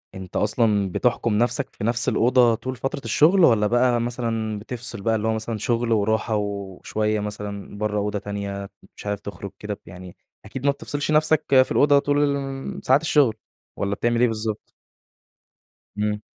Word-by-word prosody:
أنت 95 -1 -9
أصلًا 105 -3 +2
بتحكم 120 +1 0
نفسك 125 +3 0
في - - -7
نفس 115 +1 +1
الأوضة، 120 -1 +4
طول 130 +3 -5
فترة 135 +3 -4
الشغل؟ 155 - +4
والّا 105 -5 +4
بقى 120 0 +2
مثلًا، 115 -3 -2
بتفصل 120 -1 -7
بقى، 115 +2 +1
اللي 110 0 -1
هو 110 - +2
مثلًا، 110 0 -3
شغل 115 +2 -1
وراحة 110 +1 +1
وشوية 105 +1 -2
مثلًا، 105 -1 -6
برّه 105 0 -1
أوضة 105 0 -1
تانية، 100 -1 -5 0.3
مش - - -11
عارف 105 -1 -2
تخرج 100 -1 -8
كده 105 0 -4
ب - - -8
يعني 90 0 -11 0.3
أكيد 130 +5 -7
ما 140 - +5
بتفصلش 145 +1 -4
نفسك 155 0 +3 0.2
في - - -13
الأوضة 145 -1 +5
طول 145 +1 +1
الُ 140 - +2 0.4
ن - - -8
ساعات 130 +3 +3
الشغل، 145 -8 +3 0.4
والّا 100 0 -1
بتعمل 120 +2 0
إيه 125 - +5
بالضبط؟ 110 -1 -4 1.2
إمم. 105 0 -1
110 Hz, 170 wpm, -23 LUFS, 105-125 Hz, 1.2 s, ما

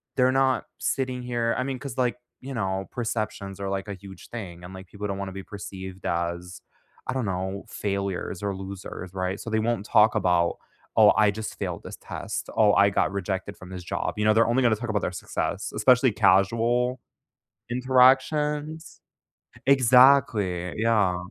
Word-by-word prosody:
They're 130 0 +4
not 135 0 +2
sitting 130 -2 -2
here 120 -1 -1
I 125 - 0
mean, 135 -1 -4
'cause, 135 -3 -7
like, 125 -2 +1 0.2
you 135 +1 -7
know, 95 -4 -2
perceptions 110 -4 -4
are, 100 -1 -3
like, 95 +1 -3
a 100 - -4
huge 95 -1 -13
thing, 90 -7 -8
and, 90 +2 -9
like, 95 0 -9
people 105 +2 -6
don't 100 -1 -3
wanna 100 -1 -4
be 95 0 -7
perceived 95 -2 -9
as, 85 +1 -3 0.5
I 130 - -1
don't 130 -3 -1
know, 95 +1 -3
failures 100 -2 -3
or 100 -1 -1
losers, 95 -1 -8
right? 95 +1 -2
So, - - -6
they 110 0 +1
won't 110 -2 -1
talk 105 +1 +4
about, 90 -4 +2 0.4
"Oh, - - +7
I 105 -1 +5
just 110 +1 -7
failed - - -4
this - - -8
test, - - -6
oh, 105 -2 +5
I 100 - +5
got 100 - +1
rejected 100 0 -4
from 95 - -12
this 90 -1 -7
job." - - -3
You 105 - 0
know? 110 - +5
They're 115 +1 +4
only 125 +3 +2
gonna 115 -3 +4
talk 120 +2 -5
about 105 -2 0
their - - -1
success, - - -3
especially 125 -1 +4
casual 115 +6 +2 0.7
interactions 135 +5 +2 0.7
exactly, 125 -9 +4
yeah. 105 -5 +2
105 Hz, 175 wpm, -25 LUFS, 95-125 Hz, 0.7 s, Oh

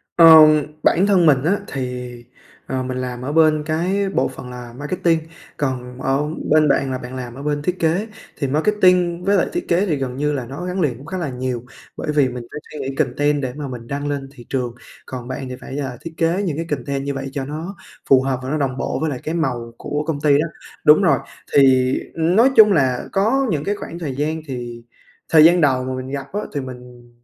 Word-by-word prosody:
Ờm, 155 -2 +8 0.2
bản 190 +4 +4
thân 190 -4 +4
mình 140 -4 +4
á 195 +6 +2
thì, 125 -2 -4 0.6
ờ, 130 -1 -2
mình 130 0 -4
làm 125 -1 -4
ở 130 +3 -3
bên 155 -1 +4
cái 185 +5 0
bộ - - +1
phận 125 - -9
là 125 -1 -9
marketing, 165 +3 0 0.4
còn 130 -2 -3
ở 135 +3 0 0.2
bên 155 0 +5
bạn 135 -1 +1
là 130 - -2
bạn 125 0 -8
làm 125 -2 -6
ở 140 - -8
bên 145 -1 -1
thiết 180 +4 -2
kế. 170 +7 +1 0.3
Thì 140 - -1
marketing 180 +2 +2
với 200 0 +3
lại - - +2
thiết 350 - -3
kế 175 +4 +2
thì 165 -6 0
gần 130 -2 -3
như 150 +1 0
là 130 -4 -3
nó 140 +9 -7
gắn 180 +1 -2
liền 130 -7 0
cũng 135 - -13
khá 185 - -5
là 170 -5 -2
nhiều, 125 -2 -3 0.3
bởi - - -2
vì 140 -3 +4
mình 125 -1 -6
phải 150 - -6
suy 150 - -7
nghĩ 135 0 -4
content 145 +1 +1
để 130 -2 -3
mà 145 -1 -5
mình 120 -3 -8
đăng 145 +1 -3
lên 140 -2 -3
thị 120 -4 -13
trường, 125 -3 -2 0.3
còn 125 -2 -7
bạn 130 0 -5
thì 125 - -5
phải, 135 - -7
ờ, 130 -4 -4
thiết 165 +1 -8
kế 170 +4 +1
những 160 -6 -2
cái 165 - -3
content 140 -1 -2
như 140 0 -2
vậy 135 0 -5
cho 135 -2 -3
nó 160 +7 -6 0.3
phù 135 -1 +7
hợp 130 -1 -1
và 130 - -4
nó 155 - 0
đồng 135 -3 -1
bộ - - -2
với 160 - 0
lại 130 - -4
cái 160 - -3
màu 120 -7 -2
của 150 +1 -3
công 150 -3 -2
ty 145 -2 +4
đó. 155 - +1 0.4
Đúng 150 +5 +7
rồi, 140 -8 +4 0.3
thì 130 -2 +5 0.2
nói 180 +10 +4
chung 210 -2 +8
là 130 -6 +1
có 245 +8 +2
những 150 -4 -1
cái 205 +4 -1
khoảng 170 -4 -8
thời 145 -6 -4
gian 155 +3 -2
thì 120 -3 -6 0.5
thời 155 -2 +7
gian 175 +1 +6
đầu 130 -4 +3
mà 130 0 -3
mình 130 0 -6
gặp 140 -1 -4
á 205 - -1
thì 145 - -2
mình 125 -2 -11
145 Hz, 240 wpm, -20 LUFS, 130-165 Hz, 0.6 s, Ờm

